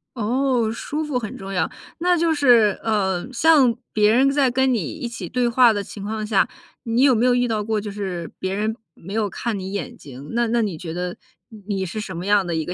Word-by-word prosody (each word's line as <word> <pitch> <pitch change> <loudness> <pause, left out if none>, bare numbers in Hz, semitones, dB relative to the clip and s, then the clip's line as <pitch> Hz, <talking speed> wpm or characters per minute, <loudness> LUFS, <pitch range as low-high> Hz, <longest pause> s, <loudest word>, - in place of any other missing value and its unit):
哦， 245 0 +1
舒 295 +6 -4
服 290 -5 -1
很 215 -4 -6
重 195 0 -7
要。 180 -3 0 0.3
那 355 +1 +3
就 330 0 +2
是， 240 -8 +4
呃， 205 0 0
像 270 -3 +4 0.2
别 210 0 +4
人 265 +4 +4
在 280 -2 +3
跟 260 +1 +2
你 230 - +1
一 245 - -5
起 215 -7 -7
对 250 -1 +1
话 240 0 +5
的 205 -2 -2
情 200 +1 -9
况 215 +1 -3
下， 210 -1 +2 0.4
你 235 +3 +1
有 275 - +6
没 235 +1 +2
有 250 -1 +4
遇 245 0 +2
到 220 -2 -1
过 220 0 -1
就 205 0 -6
是 190 -4 -5
别 190 0 -2
人 215 +2 -1 0.2
没 195 +4 -10
有 215 -2 0
看 230 0 -3
你 190 +1 -6
眼 195 -7 -4
睛， 140 +1 -11
那 235 0 +1
那 235 +1 +1
你 200 -7 -2
觉 160 0 -6
得 180 +1 -3 0.3
你 220 -2 -12
你 195 -2 -1
是 190 +5 -5
什 190 -5 -7
么 175 - -5
样 205 -1 +3
的 170 - -2
一 160 -1 -1
个 180 - -4
220 Hz, 260 characters per minute, -22 LUFS, 195-245 Hz, 0.4 s, 有